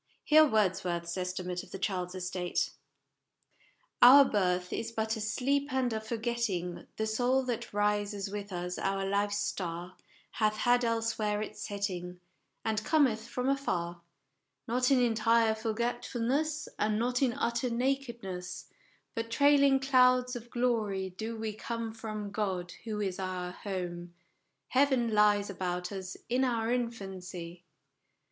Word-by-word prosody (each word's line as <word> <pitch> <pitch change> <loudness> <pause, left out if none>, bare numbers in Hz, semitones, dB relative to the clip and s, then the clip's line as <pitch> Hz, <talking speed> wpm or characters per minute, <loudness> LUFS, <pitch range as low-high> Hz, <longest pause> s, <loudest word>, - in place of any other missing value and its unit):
Hear 310 0 +7
Wordsworth's 185 -6 0
estimate 180 -1 -3
of - - -14
the - - -6
child's 185 -2 -2
estate: 180 -1 -2 1.3
"Our 275 +3 +10
birth 180 -5 0
is 230 - -3
but 220 0 -1
a 220 - -5
sleep 275 +6 0
and 260 -3 +1
a 220 - -2
forgetting: 220 -6 -2
The 220 - 0
soul 245 +4 +2
that 245 -3 -3
rises 205 -1 0
with 205 0 -5
us, 180 0 -4
our 195 0 -1
life's 205 +1 +1
star, 180 -3 -3 0.4
Hath 215 -1 +1
had 245 +2 +3
elsewhere 225 -2 0
its - - -8
setting, 180 -3 -4 0.5
And 215 -1 0
cometh 250 -8 +2
from 250 +1 -2
afar; 175 -11 -1 0.7
Not 250 +2 +2
in 270 -2 +5
entire 230 -1 +3
forgetfulness, 240 +6 -1
And 210 0 +1
not 245 +3 0
in 255 -3 +3
utter 235 -1 -1
nakedness, 235 -8 -3 0.4
But 230 -2 -3
trailing 280 +2 +5
clouds 255 -1 +4
of 240 0 -8
glory 215 -6 0
do 220 +5 -5
we 220 -1 -3
come 230 +1 -4
From 215 -2 -5
God, 190 -4 -2
who 215 -2 -3
is 190 -2 -2
our 185 -1 -3
home: 175 -3 -5 0.5
Heaven 260 -4 +3
lies 205 -1 +4
about 180 -1 -3
us 190 -1 -6
in 250 +2 +1
our 230 -3 0
infancy 185 -7 -4
220 Hz, 135 wpm, -31 LUFS, 190-245 Hz, 1.3 s, Our